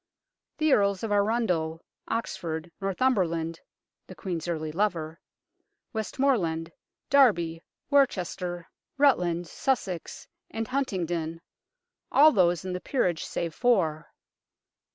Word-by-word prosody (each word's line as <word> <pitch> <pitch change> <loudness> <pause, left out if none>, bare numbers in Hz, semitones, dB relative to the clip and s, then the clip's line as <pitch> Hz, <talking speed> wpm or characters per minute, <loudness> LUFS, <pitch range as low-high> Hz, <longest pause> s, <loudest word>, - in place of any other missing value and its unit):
The 310 -3 +3
Earls 200 -1 +2
of 225 - -2
Arundel, 200 -7 0 0.2
Oxford, 170 -7 -3
Northumberland 180 -6 0 0.5
(the - - -10
Queen's 175 -4 -4
early 155 -2 -2
lover) 165 -3 -1 0.7
Westmorland, 210 -8 0 0.4
Derby, 175 -13 +4 0.3
Worcester, 180 -10 +1 0.3
Rutland, 175 -12 +3
Sussex, 195 -10 -2 0.2
and 225 0 -4
Huntingdon 175 - -2 0.7
all 305 +3 +7
those 175 - +2
in 185 - -3
the 180 - -4
peerage 180 - 0
save 170 -2 -3
four. 175 -11 +1
180 Hz, 95 wpm, -27 LUFS, 165-230 Hz, 0.7 s, all